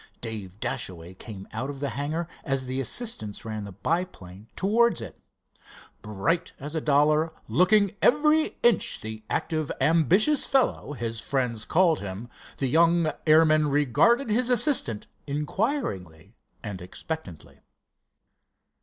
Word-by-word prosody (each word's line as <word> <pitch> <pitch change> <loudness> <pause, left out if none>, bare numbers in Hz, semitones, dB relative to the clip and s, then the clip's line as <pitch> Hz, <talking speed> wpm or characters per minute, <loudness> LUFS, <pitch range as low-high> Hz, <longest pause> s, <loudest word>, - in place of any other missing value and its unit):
Dave 105 -4 -7
Dashaway 85 -4 -4
came 95 0 -8
out 125 +5 -3
of 140 -1 -7
the 140 0 -2
hangar 155 +5 -3 0.2
as 135 -3 -1
the 130 +1 -3
assistants 125 - -2
ran 110 -2 -5
the 100 - -8
biplane 105 - -4
towards 225 - +2
it. 105 -8 -9 0.8
Bright 105 - -1
as 145 +3 -6
a 160 - -1
dollar, 150 +2 +3 0.2
looking 195 - +3
every 305 +4 +3
inch 235 -7 +3
the 110 0 -6
active, 155 -2 -2
ambitious 175 - +3
fellow 260 - +1
his 115 -3 -3
friends 125 -5 -1
called 170 -2 +3
him, 100 +4 -7 0.3
the 135 - -1
young 165 +3 +3 0.2
airman 155 -1 +5
regarded 150 - +3
his 245 +3 +2
assistant 245 - +2 0.2
inquiringly 140 - -3 0.3
and 100 -4 -6
expectantly. 90 - -7
145 Hz, 125 wpm, -26 LUFS, 110-175 Hz, 0.8 s, airman